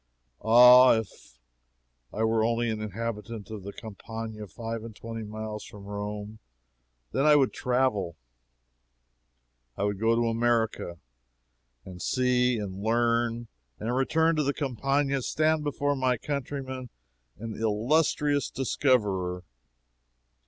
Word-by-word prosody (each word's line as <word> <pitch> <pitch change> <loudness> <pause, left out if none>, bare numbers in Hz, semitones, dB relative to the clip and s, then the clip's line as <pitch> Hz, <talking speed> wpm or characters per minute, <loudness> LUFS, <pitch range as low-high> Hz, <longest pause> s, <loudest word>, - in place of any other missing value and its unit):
Ah, 125 +2 +8
if 100 - -8 0.7
I 110 - -2
were 110 0 +2
only 115 0 +1
a 110 -1 -4
habitant 110 0 -5
of 110 -2 -6
the 100 +2 -7
Campagna 110 0 -8
five 115 +2 -6
and 115 -2 -9
twenty 115 +1 -7
miles 110 0 -6
from 100 -1 -12
Rome! 105 +1 -6 0.7
Then 140 - +1
I 150 - +7
would 135 -3 +3
travel. 125 -9 0 1.6
I - - -1
would 100 -1 -1
go 115 +1 +3
to 120 0 +1
America, 115 -6 0 0.9
and 90 -1 -10
see, 125 -1 +2
and 100 -2 -5
learn, 115 +1 +1 0.3
and 120 +3 -2
return 160 +5 +2
to 150 - +2
the 140 0 -1
Campagna 140 +1 0
and 130 - -4
stand 155 +2 +1
before 145 0 0
my 130 -2 +1
countrymen 130 -2 -5 0.5
an 115 0 -6
illustrious 140 +6 +1
discoverer. 100 -10 0
115 Hz, 125 wpm, -27 LUFS, 105-130 Hz, 1.6 s, Ah